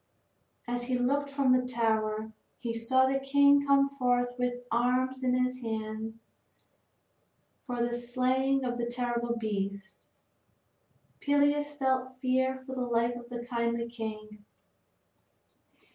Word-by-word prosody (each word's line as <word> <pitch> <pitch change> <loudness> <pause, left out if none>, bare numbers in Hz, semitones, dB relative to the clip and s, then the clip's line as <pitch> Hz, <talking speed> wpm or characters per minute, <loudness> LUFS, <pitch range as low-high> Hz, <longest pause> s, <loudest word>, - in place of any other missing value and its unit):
As 245 0 -2
he 250 0 0
looked 280 +3 +1
from 275 -2 +2
the 255 0 +3
tower 220 -3 0 0.3
he 235 -2 -4
saw 260 +3 +3
the 270 +1 +1
king 280 +1 +5
come 275 0 +5
forth 245 -1 +1
with 245 0 -1
arms 255 +2 +1
in 250 0 +2
his 255 0 -2
hands 220 -1 -4 1.5
for 245 -1 0
the 240 - -3
slaying 255 +2 +1
of 245 -1 -2
the 235 - -1
terrible 240 -1 -1
beast. 200 -2 -4 1.1
Peleus 290 +1 +2
felt 260 -2 -1
fear 260 0 0
for 265 - -6
the 260 - -3
life 240 0 +1
of 240 0 -10
the 240 -1 -6
kindly 235 -1 -1
king. 215 -2 -7
245 Hz, 130 wpm, -30 LUFS, 235-260 Hz, 1.5 s, king